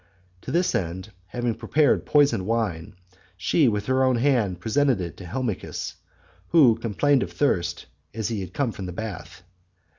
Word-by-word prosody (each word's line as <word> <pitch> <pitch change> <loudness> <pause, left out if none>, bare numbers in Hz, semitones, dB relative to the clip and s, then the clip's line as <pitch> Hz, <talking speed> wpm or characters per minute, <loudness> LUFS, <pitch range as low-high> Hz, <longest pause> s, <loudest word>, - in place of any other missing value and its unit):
To - - -6
this 175 +2 +1
end, 95 +4 -3 0.2
having 120 +3 -2
prepared 120 +7 +1
poisoned 140 -10 +3
wine, 105 -8 -2 0.4
she 135 - +2
with 105 -3 0
her 130 +2 +2
own 130 -1 +3
hand 115 -8 +1
presented 130 +4 +1
it 85 -2 -5
to 95 - -9
Helmichis, 120 -1 -4 0.5
who 145 -9 +6
complained 120 +5 +1
of - - -3
thirst 90 -12 0 0.3
as 110 -1 -3
he 100 -5 -3
came 120 +8 -1
from 95 -3 -7
the 90 - -6
bath. 90 -3 -7
115 Hz, 155 wpm, -24 LUFS, 95-130 Hz, 0.5 s, who